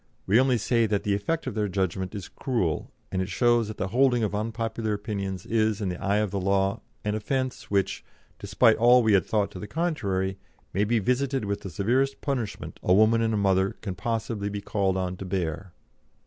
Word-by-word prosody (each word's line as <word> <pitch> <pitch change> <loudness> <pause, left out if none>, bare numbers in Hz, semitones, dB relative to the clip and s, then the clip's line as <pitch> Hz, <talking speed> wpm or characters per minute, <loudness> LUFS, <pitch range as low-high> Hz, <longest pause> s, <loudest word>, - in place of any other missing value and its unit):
We 105 +5 +4
only 130 -1 +3
say 115 +1 +2
that 105 -1 0
the 105 - +1
effect 155 +12 -1
of 130 - -3
their 105 -1 0
judgment 95 0 -2
is 100 -3 -6
cruel, 115 - -2 0.2
and 95 - 0
it 95 - -3
shows 120 +3 +3
that 110 - -7
the 95 - -2
holding 125 +1 +3
of 105 - -1
unpopular 110 +1 -2
opinions 100 -3 -4
is, 110 -2 +1
in 100 -3 -1
the 90 - -5
eye 100 +1 +2
of 105 -2 0
the 100 - -1
law, 100 +3 +1 0.2
an 105 - 0
offence 130 +4 -2
which, 100 -1 0 0.4
despite 110 +3 +3
all 120 +1 +6
we 110 -2 +3
had 95 -4 +3
thought 105 -2 +1
to 90 - -8
the 105 - -6
contrary, 100 - -1 0.3
may 100 +3 +2
be 115 +3 +2
visited 125 +3 0
with 100 0 -2
the 95 - -6
severest 125 - 0
punishment 125 -8 -4
a 90 - +3
woman 110 +2 +5
and 110 -1 +1
a - - 0
mother 95 -1 +2
can 100 -4 -4
be - - -16
possibly 110 -3 -2
called 100 -2 0
on 90 -1 -2
to 95 - -7
bear." 90 -1 -3
105 Hz, 210 wpm, -26 LUFS, 95-115 Hz, 0.4 s, all